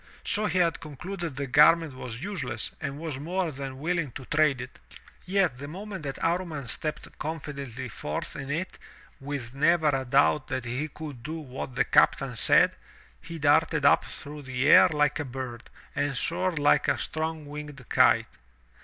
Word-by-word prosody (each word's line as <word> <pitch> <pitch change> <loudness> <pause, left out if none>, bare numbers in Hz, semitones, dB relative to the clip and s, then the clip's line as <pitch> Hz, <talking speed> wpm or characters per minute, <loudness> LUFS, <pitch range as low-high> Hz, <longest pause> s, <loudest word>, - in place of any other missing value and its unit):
So 210 +1 +1
he 185 - -1
had 170 -3 +2
concluded 170 +1 -6
the 140 +1 -3
garment 150 +3 +5
was 125 0 -7
useless 135 - -3
and 140 - -4
was 155 -4 -5
more 175 +3 -2
than 135 -1 -6
willing 160 -1 -1
to 130 - -8
trade 150 -3 +2
it. 125 +1 -9 0.5
Yet 180 -9 +1
the 145 - -6
moment 190 +3 -7
that 140 -2 -5
Amman 165 -6 -1
stepped 155 +5 -4
confidently 140 -5 -5
forth 75 -9 -5
in 140 -1 -6
it, 165 +6 -3 0.4
with 135 -3 -5
never 155 +2 +3
a 135 -2 0
doubt 135 +2 +3
that 130 - -3
he 125 +6 -2
could 150 -5 -9
do 155 +7 -5
what 130 -3 -7
the 125 - +2
captain 135 -3 +3
said, - - +6 0.5
he 165 - -8
darted 150 0 +3
up 140 - +5
through 150 +1 -8
the 130 -1 -1
air - - +8
like 150 -2 +1
a - - -1
bird, 125 -2 -7 0.3
and 140 -2 -1
soared 175 +4 -1
Uke 145 0 +3
a - - +2
strong 160 -1 -3
winged 145 -3 -9
kite. - - +4
145 Hz, 170 wpm, -27 LUFS, 130-165 Hz, 0.5 s, air